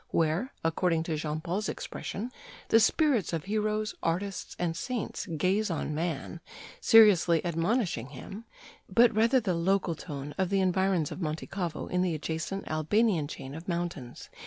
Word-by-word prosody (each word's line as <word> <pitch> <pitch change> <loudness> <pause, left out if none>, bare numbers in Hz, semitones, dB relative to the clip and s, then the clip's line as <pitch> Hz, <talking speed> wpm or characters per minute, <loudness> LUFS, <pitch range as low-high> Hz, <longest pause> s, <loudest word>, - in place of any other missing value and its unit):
where, 165 - +1
according 165 0 +1
to 165 -1 -2
Jean 155 0 -3
Paul's 180 +6 -2
expression, 230 +6 -5 0.4
the 225 - +6
spirits 245 - +2
of 165 - -1
heroes, 215 +1 -1
artists, 190 +4 -2
and 170 -2 -1
saints 240 +4 -4
gaze 185 +6 +1
on 155 -2 -2
man, 165 0 -3 0.4
seriously 200 - +6
admonishing 170 - 0
him, 195 - -9 0.4
but 235 0 +5
rather 230 +4 +4
the 205 -6 -1
local 180 +1 +1
tone 145 -3 -7
of 190 -2 +1
the 195 0 +2
environs 190 -3 +1
of - - -6
Monte 155 -1 -3
Cavo 175 -5 -4
in 180 - 0
the 180 -3 +1
adjacent 160 +5 -4
Albanian 160 +1 +1
chain 135 -2 -8
of 160 +5 -9
mountains. 170 -8 -4
180 Hz, 155 wpm, -29 LUFS, 160-210 Hz, 0.4 s, the